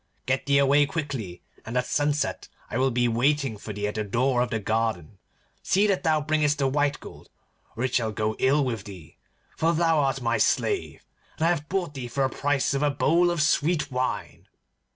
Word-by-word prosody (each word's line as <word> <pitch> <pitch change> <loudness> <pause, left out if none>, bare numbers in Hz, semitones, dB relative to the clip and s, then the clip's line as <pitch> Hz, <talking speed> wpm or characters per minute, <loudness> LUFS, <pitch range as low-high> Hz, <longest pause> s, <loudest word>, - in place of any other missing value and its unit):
Get 135 +1 -1
thee 140 0 +4
away 140 +1 +4
quickly, 135 - -5 0.2
and 115 +3 -4
at 125 - +1
sunset 145 0 -1 0.2
I 125 - -1
will 135 +1 +3
be 120 -1 +1
waiting 135 +1 +1
for 105 +1 -8
thee 105 0 -3
at 105 - -3
the 110 - -2
door 120 +4 +1
of 125 - 0
the 110 - -1
garden. 110 -5 -2 0.4
See 200 +3 +2
that 195 -3 +1
thou 155 -1 +2
bringest 150 -1 +1
the 135 -1 +1
white 145 +1 0
gold, - - -13 0.5
or 120 - -3
it 130 -1 -1
shall 115 -3 +1
go 110 0 -2
ill 140 +2 +3
with 115 -6 -3
thee, 90 -5 -12 0.4
for 165 +1 +1
thou 165 -1 +2
art 135 -2 +1
my 115 -2 0
slave, 395 - 0 0.3
and 160 - 0
I - - +4
have 150 -3 -3
bought 180 -5 -2
thee 130 -3 -6
for 135 +3 0
the - - -10
price 145 -1 0
of 140 - -1
a 150 - +3
bowl 165 +5 +2
of 170 -3 +1
sweet 150 -1 +1
wine. 130 0 -3
135 Hz, 210 wpm, -25 LUFS, 115-150 Hz, 0.5 s, thee